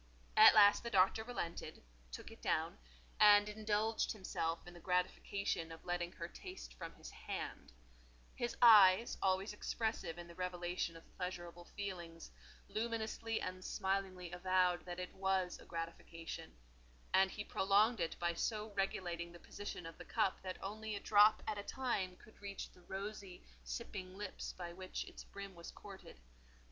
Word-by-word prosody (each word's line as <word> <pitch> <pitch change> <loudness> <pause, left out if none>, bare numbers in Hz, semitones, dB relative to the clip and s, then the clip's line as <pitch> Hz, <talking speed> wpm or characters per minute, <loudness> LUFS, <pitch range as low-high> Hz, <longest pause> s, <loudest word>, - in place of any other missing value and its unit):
At - - +10
last 205 -1 +8
the 235 - -4
Doctor 195 +1 +4
relented, 195 - -5 0.3
took - - -7
it - - -13
down, - - 0 0.4
and 205 0 +8
indulged 215 +1 0
himself 170 -5 -2
in 175 - -10
the 175 - -11
gratification 180 -1 -1
of 165 - -10
letting 175 -1 -2
her - - -5
taste - - -9
from - - -8
his - - -10
hand; - - -6 0.6
his 240 -1 -3
eyes, 210 -1 +8
always 190 +2 +1
expressive 220 -5 -2
in 175 0 -8
the 170 - -11
revelation 175 -1 -2
of 165 - -16
pleasurable 175 -1 -5
feelings, 175 -5 -6 0.4
luminously 225 0 -2
and 185 0 -4
smilingly 190 -3 -2
avowed 180 -1 +2
that 175 0 -5
it 180 - -5
was 190 -1 0
a - - -13
gratification; 165 - -6 0.6
and 190 0 +6
he 205 - -5
prolonged 205 +4 +3
it 165 -1 -1
by 170 0 0
so 215 +4 -2
regulating 175 -3 -2
the 175 - -12
position 205 -1 -7
of 165 - -9
the - - -7
cup 190 - 0
that 185 -1 -5
only 215 +2 -4
a - - -3
drop 210 +1 +6
at 210 - -2
a - - -4
time 205 -8 -1
could 215 - -18
reach 200 -1 -6
the 180 - -19
rosy, 195 0 -6 0.2
sipping 185 - -6
lips 205 -2 -5
by 175 -1 -7
which 185 +1 -5
its - - -10
brim 200 -1 -8
was 170 -1 -9
courted. 195 - -11
185 Hz, 160 wpm, -37 LUFS, 175-205 Hz, 0.6 s, At